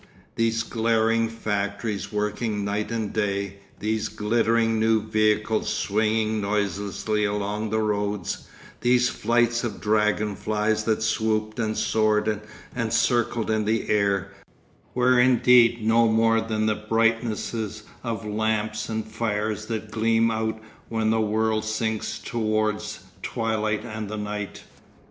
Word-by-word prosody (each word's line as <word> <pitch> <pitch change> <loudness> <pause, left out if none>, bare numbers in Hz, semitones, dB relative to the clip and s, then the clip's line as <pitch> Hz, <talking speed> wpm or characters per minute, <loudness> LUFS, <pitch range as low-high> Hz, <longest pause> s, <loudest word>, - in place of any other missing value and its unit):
These 115 -1 +1
glaring 115 0 +1
factories 105 -2 -3
working 105 0 -1
night 105 +1 -2
and 115 -3 -3
day, 100 -2 -1 0.2
these 110 +1 -1
glittering 115 +1 +1
new 110 0 +3
vehicles 110 0 +1
swinging 110 +1 0
noiselessly 100 +1 -1
along 105 +1 -1
the 110 +1 +1
roads, 105 -3 -2 0.3
these 125 +1 +3
flights 120 +1 +1
of 115 -4 -3
dragon 105 0 +1
flies 110 +1 0
that 110 -1 +1
swooped 110 0 0
and 110 -1 -1
soared 105 -1 +1 0.3
and 115 -3 -1
circled 115 -1 +1
in 110 -1 +1
the 110 +1 0
air, 100 -3 +1 0.6
were 125 0 +4
indeed 125 -2 +5
no 115 +1 +4
more 115 0 +3
than 110 -1 -1
the 110 - +3 0.2
brightnesses 115 -1 0 0.2
of 115 -4 -3
lamps 110 +1 -1
and 110 -1 -2
fires 110 -1 -2
that 110 -2 -4
gleam 115 +1 +2
out 110 0 -2 0.3
when 110 -1 +1
the 110 0 +2
world 110 0 +1
sinks 110 0 -2
towards 110 -2 -1 0.2
twilight 110 -2 -1
and 110 -2 -5
the 110 - -4
night. 105 -1 -5
110 Hz, 125 wpm, -25 LUFS, 105-115 Hz, 0.6 s, indeed